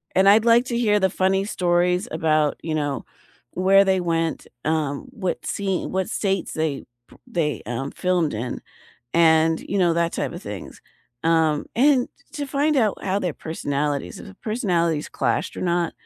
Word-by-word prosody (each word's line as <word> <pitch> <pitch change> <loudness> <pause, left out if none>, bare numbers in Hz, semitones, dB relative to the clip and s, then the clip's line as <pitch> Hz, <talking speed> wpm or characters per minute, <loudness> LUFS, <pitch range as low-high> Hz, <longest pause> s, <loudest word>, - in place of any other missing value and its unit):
And 190 +1 +5
I'd 215 +3 +6
like 235 +2 +5
to 235 -2 -2
hear 210 -3 +3
the 190 -1 +2
funny 190 +1 +1
stories 180 +1 +1
about, 155 -2 +1
you 160 -1 -2
know, 145 -3 -2 0.5
where 195 +2 +5
they 190 -1 +2
went, 165 -2 -1 0.2
um, 155 - -1
what 195 -8 -3
scene 195 -3 -2
what 190 +2 -1
states 195 -4 -1
they 155 -3 -1 0.3
p - - -17
they, 155 -4 -1
um, 120 +4 -4
filmed 180 -7 0
in, 115 +4 -4 0.5
and, 160 -1 +4
you 200 - -3
know, 175 -2 +3
that 170 0 +1
type - - -2
of - - -8
things. - - -8 0.4
Um, 160 -2 +2
and 260 0 +4 0.2
to 290 -3 -4
find 285 +2 +1
out 220 -5 +1
how 195 +1 0
their 180 -5 -2
personalities 145 - -3
if 95 - -13
personalities 170 -9 0
clashed 150 - -1
or - - -5
not, 175 -1 0
175 Hz, 170 wpm, -23 LUFS, 160-200 Hz, 0.5 s, I'd